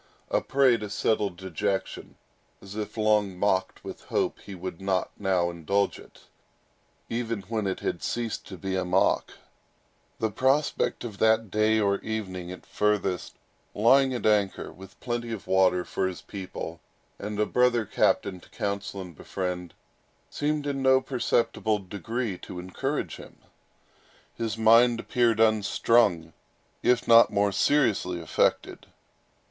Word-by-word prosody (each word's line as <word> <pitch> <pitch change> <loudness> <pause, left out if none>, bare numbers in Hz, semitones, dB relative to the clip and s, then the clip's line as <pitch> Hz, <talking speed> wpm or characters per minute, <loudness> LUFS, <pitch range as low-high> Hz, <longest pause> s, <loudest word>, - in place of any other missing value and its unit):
A - - +2
prey 135 -3 +3
to 105 -2 -6
settled 100 -2 0
dejection, 95 +2 -3 0.4
as 100 +1 -11
if 110 +1 -5
long 105 -3 +2
mocked 95 -1 0
with - - -9
hope - - -1
he 100 - -10
would 90 0 -7
not 95 -1 0
now 95 -3 +1
indulge 100 +4 -1
it, - - -16 0.9
even 115 -2 -3
when 110 +1 -2
it 95 - -3
had 85 - -2
ceased 120 -2 -3
to 95 - -8
be 95 +2 -3
a 95 - 0
mock, 90 - +1 0.8
the 110 -1 -1
prospect 135 +7 +1
of 110 -5 -7
that 110 -2 +3
day, 110 +1 +3
or 100 -1 +1
evening 95 -5 -5
at 90 - -10
furthest, 105 -3 -1 0.4
lying 130 +5 +5
at 120 - -4
anchor, 105 -3 +1
with 95 +1 -14
plenty 120 -1 -3
of 110 -4 -6
water 95 -1 +3
for 95 - -1
his 95 - -7
people, 90 -4 -7 0.4
and 105 +1 -5
a 105 - +3
brother 125 -2 +2
captain 95 -1 +1
to - - -19
counsel 100 -1 -4
and 90 -3 -10
befriend, 90 +1 -5 0.6
seemed 150 0 -1
in 140 -1 -2
no 130 0 +5
perceptible 120 -4 0
degree 105 +2 -4
to - - -9
encourage 90 +1 -3
him. - - -13 1.0
His 115 -2 -3
mind 115 +1 +5
appeared 115 -2 +1
unstrung, 110 -5 +3 0.5
if 125 -1 +2
not 115 0 +8
still - - -11
more 100 0 +3
seriously 100 -6 +1
affected. 80 - 0
105 Hz, 145 wpm, -27 LUFS, 95-115 Hz, 1.0 s, not